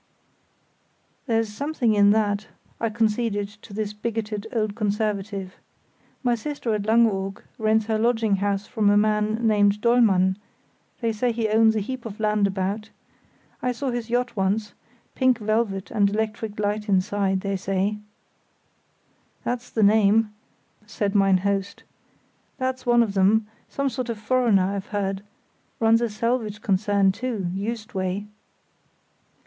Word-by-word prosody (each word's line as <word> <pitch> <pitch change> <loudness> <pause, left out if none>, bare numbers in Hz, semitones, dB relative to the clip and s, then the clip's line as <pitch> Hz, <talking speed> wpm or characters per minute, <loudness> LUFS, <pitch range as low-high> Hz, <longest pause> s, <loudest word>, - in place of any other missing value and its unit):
"There's 225 -2 +1
something 280 -2 0
in 205 -1 +5
that," 210 0 +1 0.3
I 230 - 0
conceded 215 -2 0
to 210 +1 -16
this 210 0 -3
bigoted 215 -1 -4
old 215 -4 -1
conservative; 205 -3 -2 0.7
"my 245 -1 +2
sister 235 -1 -3
at 210 -1 -2
Langeoog 205 -4 +2 0.2
rents 220 0 +2
her 220 0 0
lodging 225 -3 +2
house 200 +1 -1
from 215 -4 +1
a 205 - +5
man 215 +2 +1
named 205 -1 +3
Dollmann; 210 -5 +3 0.6
they 230 -1 +1
say 235 +3 0
he 225 -1 -1
owns 220 +1 +4
a 215 - 0
heap 255 +4 -5
of 210 -1 -9
land 210 -1 +2
about. 200 +3 -3 0.7
I 250 - 0
saw 255 +2 -3
his 240 -1 -4
yacht 245 0 0
once—pink 220 +5 -1
velvet 215 -3 -1
and 205 -3 +3
electric 215 0 -3
light 210 +1 -1
inside, 195 0 +1
they 195 0 -2
say——" 195 +2 -1 1.4
"That's 245 0 -3
the 220 - 0
name," 210 +1 +4 0.5
said 205 -2 -2
mine 195 -2 +4
host, 200 -1 -1 0.7
"that's 260 -1 -3
one 240 0 +5
of 210 -4 -3
them—some 220 +7 0
sort 255 -2 -4
of 230 - -2
foreigner, 225 -3 +2
I've 200 -1 -4
heard; 195 -2 -2 0.6
runs 225 0 +4
a 235 - 0
salvage 220 -1 -2
concern, 200 -1 +2
too, 215 -3 -3
Juist 215 +3 -4
way." 190 +1 -2
215 Hz, 135 wpm, -24 LUFS, 200-230 Hz, 1.4 s, in